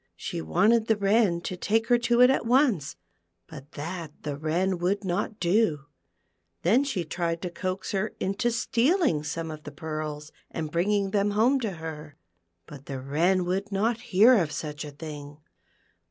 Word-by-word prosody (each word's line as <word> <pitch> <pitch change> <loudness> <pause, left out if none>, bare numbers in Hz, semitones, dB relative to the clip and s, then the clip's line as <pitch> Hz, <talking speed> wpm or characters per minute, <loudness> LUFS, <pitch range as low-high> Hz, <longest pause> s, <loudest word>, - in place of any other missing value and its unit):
She - - -5
wanted 220 - +3
the 220 - +3
Wren 200 -3 +2
to 185 - -4
take 220 +5 +1
her 240 -1 +5
to 240 0 +2
it 250 +1 +8
at 270 - 0
once, 240 - +2 0.5
but 145 -1 -12
that 165 +1 -5
the 145 -2 -3
Wren 170 +5 -1
would 195 +4 0
not 200 +4 -2
do; 175 -4 +2 0.8
then 225 +11 +4
she 220 -12 -2
tried 170 +1 -2
to 180 - -3
coax 185 +1 -4
her 200 +2 -2
into 200 +6 0
stealing 245 - +1
some 160 +2 -4
of 155 0 -8
the 150 - -9
pearls 155 0 -5 0.2
and 155 -2 -5
bringing 195 +3 +1
them 205 0 +2
home 230 +7 +3
to 220 -6 -3
her, 155 -3 -8 0.5
but 145 -2 -12
the 135 -2 -4
Wren 170 +8 +1
would 195 +3 -2
not 220 +4 0
hear 225 +3 +5
of 160 -5 -1
such 150 -1 -5
a 150 - -7
thing. 145 -1 -9
180 Hz, 170 wpm, -27 LUFS, 155-215 Hz, 0.8 s, it